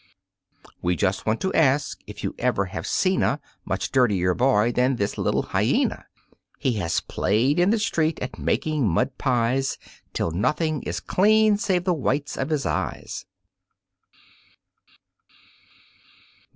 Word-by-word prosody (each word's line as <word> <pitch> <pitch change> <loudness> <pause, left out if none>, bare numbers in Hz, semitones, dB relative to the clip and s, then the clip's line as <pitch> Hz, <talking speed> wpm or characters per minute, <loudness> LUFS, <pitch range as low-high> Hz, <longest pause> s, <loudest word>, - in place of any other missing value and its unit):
We 90 +1 +1
just 95 +3 -1
want 110 +1 +1
to 190 - -1
ask 140 -2 +2
if - - -9
you - - -2
ever 100 - +1
have 85 -2 -6
seen 185 0 +1
a 140 - +1 0.3
Much - - -2
dirtier 100 -9 +3
boy 120 -1 +3
than 125 +2 +2
this 100 -3 -2
little - - 0
Hyena? - - 0 0.5
He 130 - 0
has 85 -4 0
played 125 +10 +1
in 175 +2 +4
the 225 - +3
street 165 -7 0
at 125 - -6
making 155 -6 0
mud 125 +10 0
pies 125 0 +1 0.3
Till 85 - -1
nothing 150 - 0
is 90 +6 -4
clean 215 +2 +4
save 190 -5 0
the 180 0 +2
whites 140 -1 -1
of 135 - -3
his 150 -3 -1
eyes. - - -3
135 Hz, 140 wpm, -24 LUFS, 105-160 Hz, 0.5 s, in